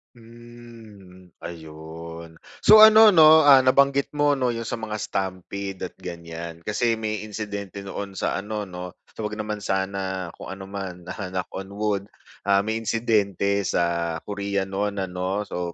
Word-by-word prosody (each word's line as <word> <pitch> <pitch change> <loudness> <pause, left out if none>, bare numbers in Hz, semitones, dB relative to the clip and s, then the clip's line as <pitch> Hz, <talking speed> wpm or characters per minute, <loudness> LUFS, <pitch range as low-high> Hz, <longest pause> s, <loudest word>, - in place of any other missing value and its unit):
Hmm, 115 -6 -15
ayun. 80 0 -9 0.2
So 215 - +8
ano, 220 0 +8
'no, 160 -3 +8
ah, 135 -3 +7
nabanggit 140 +2 +3
mo, 145 -1 +2
'no, 125 -2 0
'yong 115 - -4
sa 120 - -3
mga 110 -2 -5
stampede 95 0 -4
at - - -34
ganiyan. 85 -1 -8
Kasi 115 +4 0
may 110 -1 -3
insidente 100 -2 -6
noon 100 0 -6
sa 95 - -2
ano, 105 +1 -4
'no? 90 -2 -7 0.2
So 110 - -4
wag 105 - -4
naman 105 0 -4
sana 95 -2 -2
kung - - -7
ano 95 0 -10
man, 95 -3 -6
ah, 95 -4 -6
knock 90 -1 -3
on 95 +1 -8
wood. 105 -1 -1 0.4
Ah, 100 0 +4
may 110 +2 -2
insidente 100 -3 0
sa 85 -2 -1
Korea 100 -1 -3
noon, 100 0 -2
ano. 95 +2 -2
So 90 -1 -4
100 Hz, 155 wpm, -24 LUFS, 90-110 Hz, 0.4 s, So